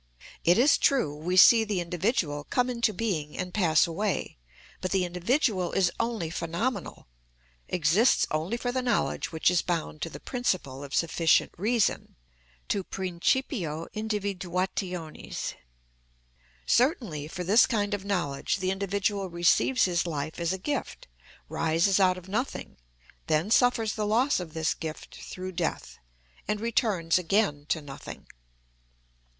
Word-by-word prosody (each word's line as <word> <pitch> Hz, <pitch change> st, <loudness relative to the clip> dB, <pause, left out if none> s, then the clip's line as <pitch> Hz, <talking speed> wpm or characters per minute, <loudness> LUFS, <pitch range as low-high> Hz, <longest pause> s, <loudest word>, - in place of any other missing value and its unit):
It 175 Hz, +2 st, +4 dB
is 275 Hz, +5 st, +5 dB
true 245 Hz, -, +2 dB
we 175 Hz, +5 st, -2 dB
see 225 Hz, +4 st, +8 dB
the 205 Hz, -4 st, -1 dB
individual 175 Hz, -, -1 dB
come 250 Hz, 0 st, 0 dB
into 235 Hz, -2 st, +1 dB
being 180 Hz, -8 st, -3 dB
and 180 Hz, -1 st, -4 dB
pass 165 Hz, -6 st, +4 dB
away; 185 Hz, -, -3 dB, 0.4 s
but 185 Hz, -, -2 dB
the 190 Hz, -1 st, +1 dB
individual 185 Hz, -, 0 dB
is 180 Hz, -3 st, +2 dB
only 225 Hz, -8 st, -2 dB
phenomenal, 175 Hz, +10 st, -3 dB, 0.6 s
exists 180 Hz, +9 st, +3 dB
only 160 Hz, +9 st, -1 dB
for 245 Hz, 0 st, -2 dB
the 255 Hz, +1 st, -1 dB
knowledge 245 Hz, -2 st, -1 dB
which 160 Hz, +1 st, +2 dB
is 180 Hz, -, +2 dB
bound 165 Hz, -3 st, -3 dB
to 165 Hz, -, -2 dB
the -, -, -9 dB
principle 180 Hz, -, -2 dB
of 140 Hz, 0 st, -5 dB
sufficient 165 Hz, -1 st, +2 dB
reason, 220 Hz, +4 st, 0 dB, 0.5 s
to -, -, 0 dB
the -, -, -5 dB
principio 180 Hz, -, -1 dB
individuationis. 190 Hz, -5 st, -3 dB, 1.1 s
Certainly, 230 Hz, -, +1 dB
for 180 Hz, +3 st, -5 dB
this 205 Hz, +7 st, +5 dB
kind 205 Hz, -3 st, 0 dB
of 200 Hz, -2 st, -3 dB
knowledge, 175 Hz, -9 st, -1 dB
the 185 Hz, -1 st, -1 dB
individual 200 Hz, 0 st, -1 dB
receives 175 Hz, +9 st, +3 dB
his 175 Hz, -1 st, 0 dB
life 155 Hz, 0 st, -4 dB
as 170 Hz, 0 st, 0 dB
a 190 Hz, -, -1 dB
gift, 280 Hz, +8 st, -4 dB, 0.4 s
rises 165 Hz, -, +2 dB
out 185 Hz, -1 st, +4 dB
of 185 Hz, 0 st, -11 dB
nothing, 230 Hz, +8 st, -3 dB, 0.5 s
then 160 Hz, +6 st, +1 dB
suffers 235 Hz, -2 st, +3 dB
the 210 Hz, -1 st, -2 dB
loss 240 Hz, +5 st, +2 dB
of 165 Hz, -3 st, -8 dB
this 160 Hz, -1 st, +1 dB
gift 160 Hz, -1 st, -8 dB
through 185 Hz, 0 st, -6 dB
death, 170 Hz, -2 st, -3 dB, 0.5 s
and 210 Hz, -, -1 dB
returns 210 Hz, -7 st, +1 dB
again 180 Hz, -5 st, 0 dB
to 160 Hz, -, 0 dB
nothing. 135 Hz, -2 st, -9 dB
185 Hz, 140 wpm, -27 LUFS, 165-220 Hz, 1.1 s, see